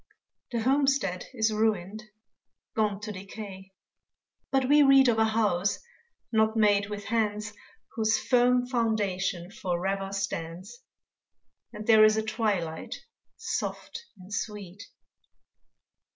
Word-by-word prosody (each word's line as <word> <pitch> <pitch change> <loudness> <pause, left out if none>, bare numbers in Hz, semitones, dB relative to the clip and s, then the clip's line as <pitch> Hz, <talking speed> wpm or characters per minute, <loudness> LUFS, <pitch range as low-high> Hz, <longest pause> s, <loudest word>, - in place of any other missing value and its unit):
The 235 -2 -1
homestead 270 -7 +1
is 220 -3 0
ruined 215 -2 0 0.7
gone 210 -2 0
to 215 0 -5
decay, 195 -1 -9 0.8
But 265 -1 +1
we 295 +2 +6
read 275 -1 +6
of 225 -2 +2
a 220 - +5
house 210 -4 +1 0.5
not 220 0 +2
made 205 -1 +3
with 205 -1 -5
hands, 210 -1 -1 0.4
Whose 220 -1 +1
firm 250 0 +3
foundation 200 -7 -1
forever 195 -1 -2
stands; 195 +2 -5 0.9
And 210 -2 -8
there 220 -1 +7
is 215 0 +5
a 220 - 0
twilight 210 -7 -2 0.4
soft 465 - -4
and 190 +2 -11
sweet. 200 -3 -5
215 Hz, 110 wpm, -28 LUFS, 195-225 Hz, 0.9 s, there